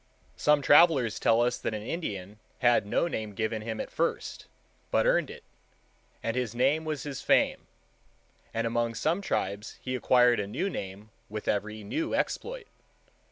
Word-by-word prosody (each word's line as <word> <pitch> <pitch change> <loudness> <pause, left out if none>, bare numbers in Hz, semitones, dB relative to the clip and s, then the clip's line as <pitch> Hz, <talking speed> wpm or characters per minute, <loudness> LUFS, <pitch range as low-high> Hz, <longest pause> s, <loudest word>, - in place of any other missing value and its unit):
Some 150 -1 +3
travellers 145 - +5
tell 115 +1 +4
us 120 - 0
that 110 - -2
an 105 - -5
Indian 105 - -5 0.2
had 120 -5 +3
no 170 - +1
name 110 -9 -4
given 110 +1 -2
him 110 0 -5
at - - -5
first, - - -2 0.4
but - - +2
earned - - +2
it, - - -10 0.8
and 115 - -1
his 125 -3 -2
name 140 +6 +2
was 155 -3 -3
his 145 -3 -5
fame; - - +2 0.8
and 115 0 -1
among 115 0 0
some 165 - 0
tribes 100 - -3
he 130 - -4
acquired 125 -1 +4
a 100 - -2
new 175 - -2
name 100 - -7 0.2
with 105 0 -6
every 105 +1 -1
new 325 - -2
exploit. - - -2
120 Hz, 160 wpm, -28 LUFS, 110-145 Hz, 0.8 s, travellers